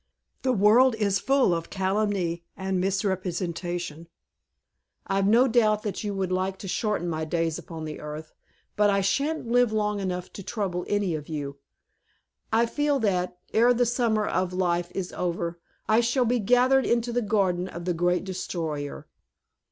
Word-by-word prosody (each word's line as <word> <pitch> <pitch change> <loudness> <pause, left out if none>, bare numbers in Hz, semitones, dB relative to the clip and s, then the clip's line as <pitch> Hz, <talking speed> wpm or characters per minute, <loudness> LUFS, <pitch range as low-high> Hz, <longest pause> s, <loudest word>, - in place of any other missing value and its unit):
"The 260 - +1
world 230 +3 +5
is 200 -3 +1
full 270 -8 +3
of 165 -1 -3
calumny 190 -3 -1
and 190 -1 -1
misrepresentation. 175 -4 -2 1.0
I've 195 0 +1
no 235 +5 +5
doubt 215 -4 +1
you 205 -1 -3
would 190 -1 -2
like 185 +1 -1
to 195 - -8
shorten 210 -2 -1
my 160 -2 -2
days 165 0 -1
upon 160 -1 -7
the 155 -1 -6
earth, 150 +1 -8 0.4
but 210 0 +4
I 200 0 +2
sha'n't 280 +8 0
live 245 -2 +4
long 210 -1 0
to 180 +2 -6
trouble 185 -5 -3
any 205 -4 0
of 150 -1 -5
you. 140 -2 -5 0.9
I 225 +1 +4
feel 290 +4 0
that, 180 -4 0 0.2
ere 240 +2 +5
the 245 +1 +3
summer 230 -3 +1
of 185 +1 -1
life 175 -1 0
is 190 -2 -3
over, 170 -1 -2 0.3
I 215 +1 +4
shall 240 +2 +2
be 240 +1 +1
gathered 250 +4 +4
into 235 0 +1
the 245 - +1
garden 190 -4 +1
of 170 -2 -7
the 180 - +1
Great 175 +1 +1
Destroyer." 160 -6 -4
195 Hz, 160 wpm, -26 LUFS, 175-225 Hz, 1.0 s, world